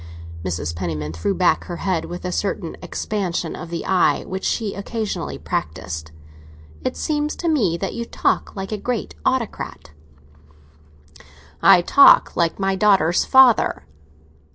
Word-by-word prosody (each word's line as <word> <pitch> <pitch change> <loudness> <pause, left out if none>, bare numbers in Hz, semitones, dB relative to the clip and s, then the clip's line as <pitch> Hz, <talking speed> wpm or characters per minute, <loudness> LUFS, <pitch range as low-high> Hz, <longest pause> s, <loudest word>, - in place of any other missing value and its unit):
Mrs. 85 -3 -3
Penniman 80 -3 -4
threw 80 - -2
back 180 0 +2
her 175 - -6
head, 180 -3 -1
with 175 +1 -7
a 180 - -2
certain 185 -2 -3
expansion 180 -6 -3
of 165 - -8
the 170 -1 -5
eye 185 -2 +2
which 190 0 -5
she 215 -4 -1
occasionally 215 +1 -4
practised. 80 0 -4 0.7
"It - - -2
seems 300 -1 -1
to 345 - -4
me 220 - +2
that 195 - -4
you 235 - -4
talk - - -1
like 195 0 -5
a 215 - -2
great 245 +1 -3
autocrat." 250 - -3 1.7
"I 190 -3 +6
talk 280 +9 +6
like 170 -1 +1
my 195 0 0
daughter's 190 -4 +3
father." 260 -3 +4
190 Hz, 140 wpm, -21 LUFS, 165-215 Hz, 1.7 s, I